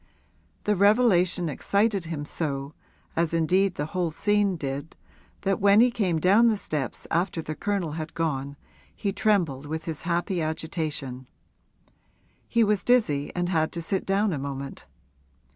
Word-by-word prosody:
The 210 Hz, -, +2 dB
revelation 195 Hz, -4 st, +3 dB
excited 200 Hz, +5 st, 0 dB
him 155 Hz, -3 st, -4 dB
so 140 Hz, -2 st, -3 dB, 0.4 s
as 165 Hz, 0 st, +1 dB
indeed 185 Hz, +3 st, +2 dB
the 145 Hz, -, -2 dB
whole 180 Hz, -2 st, 0 dB
scene 205 Hz, +3 st, +1 dB
did 140 Hz, +1 st, -5 dB, 0.5 s
that 195 Hz, -1 st, 0 dB
when 200 Hz, +1 st, +6 dB
he 245 Hz, +2 st, +5 dB
came 195 Hz, -8 st, 0 dB
down 200 Hz, +8 st, +5 dB
the 220 Hz, -2 st, +2 dB
steps 150 Hz, -9 st, -4 dB
after 175 Hz, +1 st, 0 dB
the 155 Hz, -1 st, -4 dB
Colonel 195 Hz, -2 st, -2 dB
had 155 Hz, 0 st, -6 dB
gone 140 Hz, -4 st, -2 dB, 0.4 s
he 200 Hz, -2 st, -2 dB
trembled 175 Hz, -10 st, +1 dB
with 160 Hz, +2 st, -4 dB
his 160 Hz, -3 st, -4 dB
happy 175 Hz, +1 st, -1 dB
agitation; 155 Hz, -5 st, -3 dB, 1.2 s
he 230 Hz, 0 st, +3 dB
was 210 Hz, -2 st, +1 dB
dizzy 180 Hz, -, +2 dB
and 175 Hz, 0 st, -1 dB
had 160 Hz, -3 st, +1 dB
to 170 Hz, -, -3 dB
sit 190 Hz, +3 st, -1 dB
down 195 Hz, 0 st, +2 dB
a 145 Hz, -, -2 dB
moment. 140 Hz, 0 st, -6 dB
170 Hz, 150 wpm, -26 LUFS, 155-200 Hz, 1.2 s, when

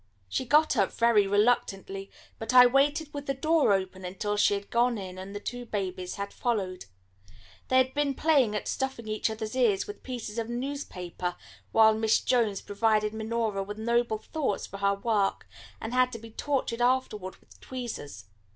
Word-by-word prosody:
She 260 Hz, -, -2 dB
got 300 Hz, +5 st, +4 dB
up -, -, +2 dB
very 230 Hz, -4 st, +3 dB
reluctantly, 195 Hz, -2 st, +1 dB, 0.3 s
but 225 Hz, +3 st, -2 dB
I 250 Hz, 0 st, +10 dB
waited 290 Hz, +4 st, +2 dB
with 285 Hz, 0 st, -6 dB
the 275 Hz, -, 0 dB
door 310 Hz, -2 st, +3 dB
open 190 Hz, -1 st, -1 dB
until 195 Hz, +3 st, -3 dB
she 205 Hz, 0 st, +3 dB
had 200 Hz, 0 st, -7 dB
gone 235 Hz, 0 st, +2 dB
in 185 Hz, -2 st, -7 dB
and 195 Hz, +2 st, -8 dB
the -, -, -3 dB
two 245 Hz, +3 st, -5 dB
babies 185 Hz, -5 st, -4 dB
had 200 Hz, 0 st, -5 dB
followed. 195 Hz, -7 st, -2 dB, 0.8 s
They 260 Hz, -, +3 dB
had 260 Hz, 0 st, +3 dB
been 290 Hz, -2 st, 0 dB
playing 275 Hz, -10 st, +3 dB
at 210 Hz, -, -3 dB
stuffing 265 Hz, -4 st, -3 dB
each 215 Hz, +1 st, 0 dB
other's 220 Hz, +1 st, -5 dB
ears 230 Hz, -7 st, +2 dB
with 205 Hz, -, -9 dB
pieces 235 Hz, -3 st, -5 dB
of 230 Hz, 0 st, -3 dB
newspaper 235 Hz, -9 st, -4 dB, 0.4 s
while 220 Hz, -1 st, +6 dB
Miss 220 Hz, 0 st, +2 dB
Jones 225 Hz, -6 st, +1 dB
provided 215 Hz, 0 st, +1 dB
Minora 220 Hz, -2 st, -1 dB
with 205 Hz, +2 st, -6 dB
noble 235 Hz, 0 st, +1 dB
thoughts 275 Hz, -1 st, -2 dB
for 195 Hz, -, -9 dB
her 200 Hz, 0 st, +2 dB
work, 200 Hz, -1 st, 0 dB, 0.3 s
and 225 Hz, +2 st, -5 dB
had 255 Hz, 0 st, +3 dB
to -, -, -4 dB
be 230 Hz, 0 st, -12 dB
tortured 255 Hz, -2 st, -2 dB
afterward 240 Hz, -7 st, 0 dB
with -, -, -22 dB
tweezers. 225 Hz, -, -6 dB
220 Hz, 180 wpm, -28 LUFS, 200-250 Hz, 0.8 s, I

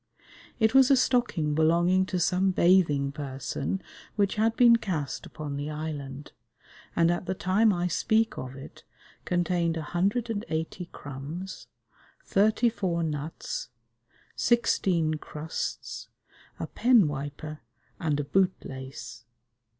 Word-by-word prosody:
It 220 Hz, 0 st, +3 dB
was 265 Hz, -1 st, +7 dB
a 275 Hz, -, +7 dB
stocking 240 Hz, -, +1 dB
belonging 170 Hz, +4 st, +3 dB
to 180 Hz, -, -1 dB
some 185 Hz, +2 st, +2 dB
bathing 170 Hz, -7 st, +3 dB
person 140 Hz, +5 st, -4 dB, 0.3 s
which 200 Hz, -2 st, +2 dB
had 225 Hz, +1 st, +1 dB
been 235 Hz, -1 st, +7 dB
cast 160 Hz, -, -3 dB
upon 145 Hz, -2 st, -6 dB
the 145 Hz, +1 st, -3 dB
island, 150 Hz, -2 st, -6 dB, 0.6 s
and 170 Hz, 0 st, +4 dB
at 175 Hz, +1 st, -2 dB
the 190 Hz, -, -1 dB
time 200 Hz, +5 st, +3 dB
I 175 Hz, -2 st, 0 dB
speak 220 Hz, +5 st, +1 dB
of 130 Hz, 0 st, -6 dB
it 135 Hz, -, -11 dB, 0.4 s
contained 175 Hz, -2 st, +1 dB
a 160 Hz, -, -3 dB
hundred 200 Hz, +9 st, 0 dB
and 210 Hz, -1 st, -2 dB
eighty 160 Hz, +2 st, -3 dB
crumbs, 145 Hz, +8 st, -7 dB, 0.6 s
thirty 215 Hz, +4 st, +3 dB
four 185 Hz, -7 st, -1 dB
nuts, 150 Hz, -3 st, -4 dB, 0.7 s
sixteen 175 Hz, -9 st, +2 dB
crusts, 155 Hz, +2 st, -5 dB, 0.5 s
a -, -, -2 dB
pen 240 Hz, -8 st, +4 dB
wiper 145 Hz, +1 st, -5 dB, 0.4 s
and 155 Hz, -5 st, 0 dB
a -, -, 0 dB
boot 190 Hz, +6 st, +2 dB
lace. 130 Hz, -3 st, -8 dB
170 Hz, 125 wpm, -28 LUFS, 150-195 Hz, 0.7 s, was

